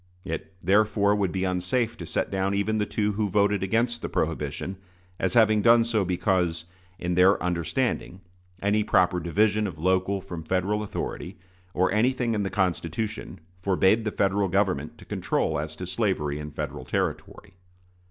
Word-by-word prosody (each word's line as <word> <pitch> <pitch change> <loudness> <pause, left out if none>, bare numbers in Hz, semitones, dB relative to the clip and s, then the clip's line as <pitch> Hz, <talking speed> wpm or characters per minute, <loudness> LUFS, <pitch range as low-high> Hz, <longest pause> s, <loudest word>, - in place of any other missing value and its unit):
It, 80 +3 -5
therefore, 100 +2 +3
would 100 -4 0
be 95 -1 -2
unsafe 95 +6 0
to 85 - -7
set - - -1
down 95 0 0
even 110 +2 0
the 105 - 0
two 105 -1 0
who 105 0 -1
voted 100 0 +2
against 115 +5 0
the - - -4
prohibition 95 +1 -2 0.4
as 95 -1 -1
having 110 -2 +5
done 115 +2 +6
so 115 -3 +1
because, 90 -3 0 0.3
in 90 0 -2
their 90 +3 +5
understanding, 90 +3 -1 0.4
any 105 +1 +2
proper 90 -3 +3
division 105 +5 +1
of 90 - -7
local 95 +4 +1
from 90 -3 -7
Federal 95 +5 0
authority, 105 - -5 0.4
or 95 +1 +2
anything 120 +2 +1
in 105 - 0
the 100 - -1
Constitution, 95 0 -2 0.2
forbade 95 +3 +3
the 110 - -1
Federal 100 0 +1
Government 95 -6 0
to - - -14
control 80 0 -1
as 75 +1 -5
to 90 - -6
slavery 85 -8 -1
in 75 0 -6
Federal 75 - -5
territory. 95 - -3
95 Hz, 160 wpm, -26 LUFS, 90-105 Hz, 0.4 s, done